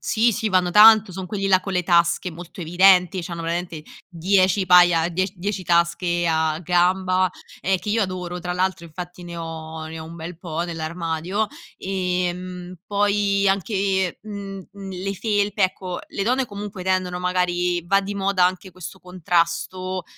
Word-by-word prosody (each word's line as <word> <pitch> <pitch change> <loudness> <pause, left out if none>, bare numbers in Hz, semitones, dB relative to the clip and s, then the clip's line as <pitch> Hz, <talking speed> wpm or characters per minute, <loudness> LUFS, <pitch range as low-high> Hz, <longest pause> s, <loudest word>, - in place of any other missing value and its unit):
Sì, 230 +2 +2
sì 220 +1 -1
vanno 185 -2 +2
tanto 215 +1 +7
son 185 +1 -6
quelli 195 +1 -2
là 185 -1 +5
con 195 - -5
le 180 -1 +1
tasche 170 +1 +2
molto 175 +2 -10
evidenti, 180 +2 +4
c'hanno 170 -1 -6
veramente 170 -1 -3 0.3
10 190 +2 +2
paia 175 -2 +5
die 185 +3 -1
10 190 +1 -4
tasche 170 0 +1
a 160 -1 +1
gamba, 185 +1 +2 0.3
ehm, 190 0 +1
che 210 - -8
io 220 +1 +2
adoro 180 -2 -4
tra 180 0 -4
l'altro 185 -1 -1
infatti 175 +2 -9
ne 170 0 -8
ho 160 -1 -6
ne 160 +1 -7
ho 160 - -7
un 165 +1 -10
bel 170 0 -8
po' 165 -2 -5
nell'armadio. 170 +4 -3 0.3
Ehm, 180 -1 -3
poi 200 -1 +1
anche, 195 -1 0
mhmm, 200 -2 -8
mhmm, 195 -1 -9
le 190 +2 -4
felpe 205 0 +1
ecco 185 -1 -4
le 200 - -4
donne 255 +5 +1
comunque 205 -3 -7
tendono 185 -1 0
magari 180 -1 0
va 195 +3 +3
di 200 +1 -5
moda 195 -2 +2
anche 185 +1 -1
questo 185 +1 -10
contrasto, 180 +1 -1
180 Hz, 165 wpm, -22 LUFS, 175-195 Hz, 0.3 s, tanto